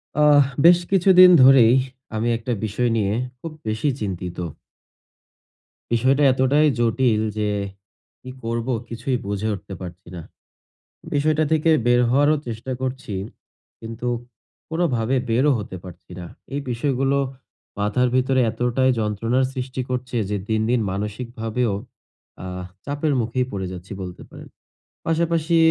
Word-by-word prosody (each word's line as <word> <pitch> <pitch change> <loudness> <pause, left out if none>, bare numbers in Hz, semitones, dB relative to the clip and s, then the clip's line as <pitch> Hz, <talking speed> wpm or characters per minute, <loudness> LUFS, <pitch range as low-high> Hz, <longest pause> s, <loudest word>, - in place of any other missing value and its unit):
আহ। 150 -1 +6 0.2
বেশ 175 0 +8
কিছুদিন 185 -1 +7
ধরেই 130 -3 +7 0.4
আমি 110 +2 -1
একটা 115 +2 -5
বিষয় 120 +4 0
নিয়ে 105 -1 0 0.3
খুব 165 - -6 0.2
বেশি 110 +7 0
চিন্তিত। 90 -3 -4 1.6
বিষয়টা 130 +5 +3
এতটাই 135 +4 +3
জটিল 115 -1 +2 0.2
যে, 105 -1 0 0.7
কি 130 - -10
করব 115 +1 -3 0.2
কিছুই 120 +2 -2
বুঝে 100 +1 -2
উঠতে 95 0 -10
পারছি 90 0 -9
না। 85 - -6 0.9
বিষয়টা 155 +2 +2
থেকে 160 +1 +2 0.2
বের 120 0 +4
হওয়ারও 145 +4 +4
চেষ্টা 115 +3 -5
করছি 130 -4 -4 0.7
কিন্তু 115 +2 -6 0.6
কোনভাবে 135 -8 0
বেরও 130 +6 +3
হতে 100 -3 -6
পারছি 90 0 -13
না। 90 - -7 0.3
এই 145 - -2
বিষয়গুলো 135 +2 0 0.6
মাথার 105 +5 +1
ভিতরে 130 +1 +2
এতটাই 125 +3 +1
যন্ত্রণার 115 +4 0
সৃষ্টি 130 0 -4
করছে 125 0 -3
যে, 105 - -1
দিন, 110 0 +1
দিন 125 0 +2
মানসিকভাবেও 110 +3 -3 0.7
আহ 90 0 -6 0.2
চাপের 145 +1 -1
মুখেই 120 +3 -1
পড়ে 95 -2 -4
যাচ্ছি 90 0 -10
বলতে 90 -2 -7
পারেন। - - -12 0.6
পাশাপাশি 165 0 +1
125 Hz, 125 wpm, -22 LUFS, 110-140 Hz, 1.6 s, বেশ